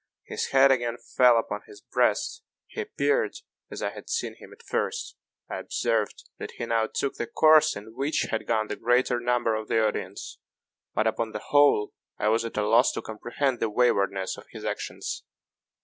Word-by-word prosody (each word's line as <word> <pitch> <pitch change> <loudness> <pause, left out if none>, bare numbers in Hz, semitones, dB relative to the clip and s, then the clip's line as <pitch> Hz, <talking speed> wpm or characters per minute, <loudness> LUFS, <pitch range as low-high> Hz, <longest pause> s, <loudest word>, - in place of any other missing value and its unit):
His - - -3
head 135 0 +5
again 120 -2 0
fell 125 -1 +4
upon 115 - -2
his 410 -1 -13
breast; 445 - 0 0.2
he 455 - -6
appeared 440 +2 0 0.3
as - - -6
I - - -1
had - - -11
seen 460 0 -2
him - - -15
at - - -16
first. 485 - -2 0.3
I - - -4
observed 115 -3 -1
that - - -6
he 120 - -5
now 115 -1 +1
took 140 - -2
the 120 - -3
course 155 -1 +5
in 105 +2 -9
which 140 +5 0
had 110 - -2
gone 110 -2 +1
the 105 - -4
greater 120 +1 +2
number 120 -1 +1
of 110 0 -3
the 115 - +2
audience 105 - -4 0.6
but, 110 - +2
upon 110 0 -1
the 105 - -3
whole, 145 -7 +4 0.2
I 105 - +1
was 115 +1 +2
at 115 - -6
a 105 - +1
loss 115 +4 +5
to - - -4
comprehend 120 +4 -2
the 115 - 0
waywardness 100 -4 +1
of - - -13
his - - -9
actions. - - -4
120 Hz, 190 wpm, -27 LUFS, 110-135 Hz, 0.6 s, head